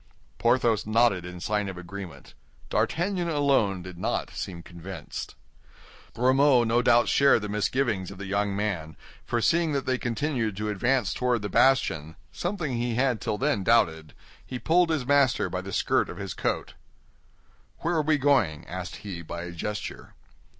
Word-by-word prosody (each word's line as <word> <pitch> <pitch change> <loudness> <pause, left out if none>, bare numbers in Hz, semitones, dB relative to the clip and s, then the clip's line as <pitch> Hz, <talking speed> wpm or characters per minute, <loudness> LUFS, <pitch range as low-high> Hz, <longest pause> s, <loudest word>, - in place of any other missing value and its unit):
Porthos 120 -3 +2
nodded 110 -5 +3
in 90 0 -8
sign 105 +2 -1
of 95 - -7
agreement. 90 0 -9 0.4
D'Artagnan 175 0 0
alone 135 - +2
did 90 -1 -9
not - - -2
seem 85 -2 -6
convinced. 85 -1 -8 0.8
Grimaud 130 0 +4
no 120 +2 +3
doubt 120 0 +4
shared 140 -6 +4
the 105 - -4
misgivings 105 -2 0
of 100 - -10
the 100 - -6
young 100 0 0
man, 95 -7 -3 0.3
for 120 - -1
seeing 165 +3 +2
that 140 -1 -1
they 130 -1 0
continued 120 -4 -1
to 105 0 -2
advance 120 +2 +1
toward 125 -3 0
the 105 - -3
bastion—something 125 - 0
he 120 -1 -1
had 125 -2 +1
till 105 - -2
then 140 -7 0
doubted—he 80 - -1
pulled 170 +6 +3
his 155 -6 0
master 140 -2 +3
by 90 - -2
the 95 +1 -8
skirt - - +1
of - - -8
his - - -5
coat. - - -2 1.1
"Where 170 - 0
are 160 - +2
we 155 0 +2
going?" 125 - +2
asked 90 0 -6
he, 90 -4 -5
by 85 +1 -6
a 90 - -6
gesture. 105 +5 -6
110 Hz, 160 wpm, -27 LUFS, 95-135 Hz, 1.1 s, Grimaud